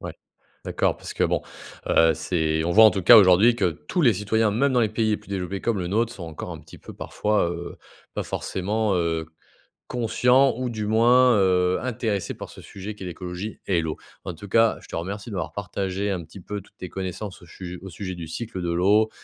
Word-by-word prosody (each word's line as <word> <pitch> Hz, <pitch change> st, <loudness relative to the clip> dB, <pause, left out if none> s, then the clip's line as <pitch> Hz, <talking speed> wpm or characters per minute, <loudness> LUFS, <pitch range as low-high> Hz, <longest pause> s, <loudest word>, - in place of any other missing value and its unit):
ouais, -, -, -6 dB, 0.5 s
d'accord -, -, 0 dB
parce -, -, -8 dB
que, -, -, 0 dB
bon, -, -, +1 dB, 0.5 s
heu, 80 Hz, 0 st, +5 dB
c'est 80 Hz, 0 st, -1 dB
on 85 Hz, -, 0 dB
voit 110 Hz, +4 st, +8 dB
en 110 Hz, -, +7 dB
tout 95 Hz, -, -2 dB
cas 120 Hz, +6 st, +10 dB
aujourd'hui 100 Hz, +4 st, +6 dB
que 90 Hz, -, +2 dB, 0.2 s
tous 180 Hz, -, 0 dB
les 120 Hz, -7 st, +5 dB
citoyens, 105 Hz, +2 st, +1 dB
même 130 Hz, +5 st, +1 dB
dans 125 Hz, -, +3 dB
les 110 Hz, -, +2 dB
pays 110 Hz, 0 st, 0 dB
les 105 Hz, -, +1 dB
plus 105 Hz, -, -19 dB
développés, 95 Hz, 0 st, -3 dB
comme 115 Hz, -4 st, 0 dB
le 90 Hz, -, -3 dB
nôtre, 115 Hz, +5 st, 0 dB
sont 95 Hz, -, -9 dB
encore 80 Hz, -2 st, -7 dB
un -, -, -7 dB
petit -, -, -14 dB
peu -, -, -12 dB
parfois, 105 Hz, -5 st, 0 dB
heu, 85 Hz, 0 st, -7 dB, 0.4 s
pas -, -, -2 dB
forcément, 105 Hz, +3 st, -1 dB
heu, 80 Hz, -2 st, 0 dB, 0.6 s
conscients 125 Hz, +2 st, +3 dB
ou 125 Hz, -1 st, -2 dB
du 110 Hz, -2 st, -4 dB
moins, 120 Hz, +2 st, +5 dB
heu, 90 Hz, -1 st, +2 dB
intéressés 115 Hz, -6 st, -2 dB
par -, -, -9 dB
ce -, -, -12 dB
sujet 100 Hz, +2 st, -8 dB
qui 95 Hz, -, -10 dB
est 90 Hz, -, -5 dB
l'écologie 90 Hz, +4 st, -6 dB
et 90 Hz, -4 st, +2 dB
l'eau. 80 Hz, -1 st, -4 dB, 0.3 s
En 90 Hz, -, -5 dB
tout 100 Hz, +5 st, -11 dB
cas, 115 Hz, +2 st, +3 dB
je -, -, -15 dB
te -, -, -7 dB
remercie, 100 Hz, +6 st, -5 dB
de 100 Hz, -, -6 dB
m'avoir 90 Hz, -, -3 dB
partagé, 100 Hz, 0 st, -3 dB
un 90 Hz, -3 st, -3 dB
petit 85 Hz, +5 st, -13 dB
peu, 105 Hz, +2 st, -5 dB
toutes -, -, -24 dB
tes 90 Hz, -, -7 dB
connaissances 95 Hz, +2 st, -6 dB
au 85 Hz, -, -14 dB
sujet 90 Hz, +1 st, -8 dB
au 95 Hz, -, -8 dB
sujet 95 Hz, +2 st, -6 dB
du 85 Hz, -2 st, -7 dB
cycle 95 Hz, +2 st, -5 dB
de 85 Hz, -1 st, -2 dB
l'eau, 105 Hz, +5 st, +3 dB
100 Hz, 230 wpm, -24 LUFS, 90-110 Hz, 0.6 s, cas